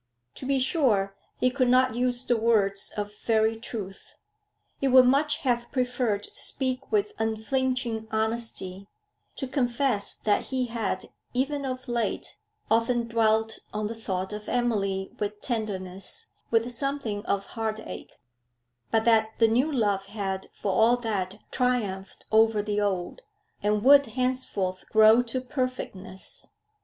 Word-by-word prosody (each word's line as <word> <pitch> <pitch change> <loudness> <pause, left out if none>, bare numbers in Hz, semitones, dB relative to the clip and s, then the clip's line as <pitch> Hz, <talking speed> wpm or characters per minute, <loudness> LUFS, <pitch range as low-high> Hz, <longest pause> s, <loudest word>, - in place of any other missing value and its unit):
To 260 - -7
be 275 -1 +2
sure, 240 - +2 0.2
he 255 - +3
could 255 -1 +1
not 255 0 +4
use 245 +1 +1
the 245 - +2
words 210 -3 +1
of 205 0 -4
very 220 0 +3
truth. 215 -4 -7 0.6
He 275 - +1
would 255 -1 +7
much 290 +4 +3
have 240 -2 0
preferred 250 -5 0
to - - -13
speak 260 -1 -2
with 210 -1 +1
unflinching 225 +1 -1
honesty, 220 -4 -2 0.5
to 270 - -4
confess 245 -4 0
that 210 -1 +1
he 260 -1 -1
had, 225 -5 -3 0.2
even 280 +2 0
of 255 0 -4
late, 240 -1 -2 0.4
often 230 +1 +2
dwelt 220 -1 +2 0.2
on 210 0 -1
the 215 - -3
thought 190 -3 -3
of 210 0 -6
Emily 200 -6 0
with 210 0 -3
tenderness, 195 -6 -3 0.2
with 230 +1 +2
something 240 -6 -2
of 200 0 0
heart 220 -2 -2
ache; - - -9 0.8
but 220 0 +2
that 220 -1 +4
the 225 - +5
new 250 +7 +2
love 205 -7 0
had, 195 -2 -4
for 200 - -3
all 225 +5 +4
that, 205 -5 -2
triumphed 210 -7 -1
over 220 -1 +4
the 210 0 -1
old, 195 - -2 0.4
and 210 0 +1
would 280 +1 +7
henceforth 225 -6 -2
grow 220 +2 +7
to 245 +1 -2
perfectness. 250 -8 -5
225 Hz, 140 wpm, -27 LUFS, 205-250 Hz, 0.8 s, would